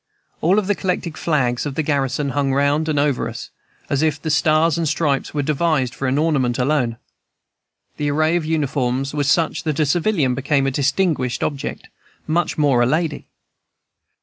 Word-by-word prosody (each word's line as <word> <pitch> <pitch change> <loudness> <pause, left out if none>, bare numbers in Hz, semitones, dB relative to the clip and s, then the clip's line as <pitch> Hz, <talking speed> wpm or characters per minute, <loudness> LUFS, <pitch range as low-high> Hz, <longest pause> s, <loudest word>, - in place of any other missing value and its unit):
All 185 +6 +3
the 205 0 0
collected 180 -4 -3
flags 125 -7 0
of 140 - -5
the 160 - 0
garrison 140 -1 0
hung 140 0 0
round 145 +3 +1
and 150 - 0
over 145 -2 +1
us, - - -8 0.4
as 140 0 0
if 155 -2 +1
the 160 +1 -3
stars 155 +1 +3
and 165 -3 0
stripes 140 -4 0
were 145 -1 -1
devised 150 -3 0
for 135 +4 -3
an 130 +2 +1
ornament 140 -6 +1
alone. 125 -3 0 1.0
The 145 0 -1
array 155 +3 +2
of 175 - 0
uniforms 135 -4 -1
was 145 -2 0
such 160 +2 +1
that 155 -2 -2
a 155 - +3
civilian 160 -3 +1
became 135 +1 0
a 135 - +1
distinguished 140 -1 0
object, 140 -2 -4 0.4
much 165 +2 0
more 140 -5 +3
a 120 - +3
lady. 155 +1 -1
145 Hz, 175 wpm, -20 LUFS, 135-160 Hz, 1.0 s, All